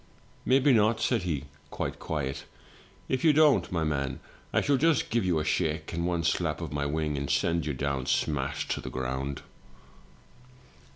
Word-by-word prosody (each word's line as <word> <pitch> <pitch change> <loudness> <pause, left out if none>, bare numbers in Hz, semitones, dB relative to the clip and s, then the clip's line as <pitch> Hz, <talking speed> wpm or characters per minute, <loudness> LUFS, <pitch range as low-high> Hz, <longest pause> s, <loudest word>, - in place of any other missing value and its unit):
" - - -30
'Maybe 135 +1 +5
not,' 110 0 +3
said 120 -5 +1
he, 80 -7 -2 0.3
quite - - -4
quiet. 70 -4 -3 0.6
'If 130 - -1
you 160 -2 +6
don't, 150 -2 +4
my 85 -3 0
man, 70 -4 -1 0.3
I - - +3
shall 145 -1 +2
just 160 0 +2
give 115 -1 +2
you 90 -3 +1
a 75 - -1
shake, 80 -2 -1
and 85 +1 -1
one 85 -2 0
slap 80 - 0
of - - -5
my 70 0 -1
wing, 75 -1 -1
and 70 - -4
send 85 -2 +1
you 75 - -2
down 70 -1 -2
smash 70 -2 0
to - - -1
the - - -6
groimd!' 65 +2 -3
80 Hz, 180 wpm, -28 LUFS, 70-110 Hz, 0.6 s, you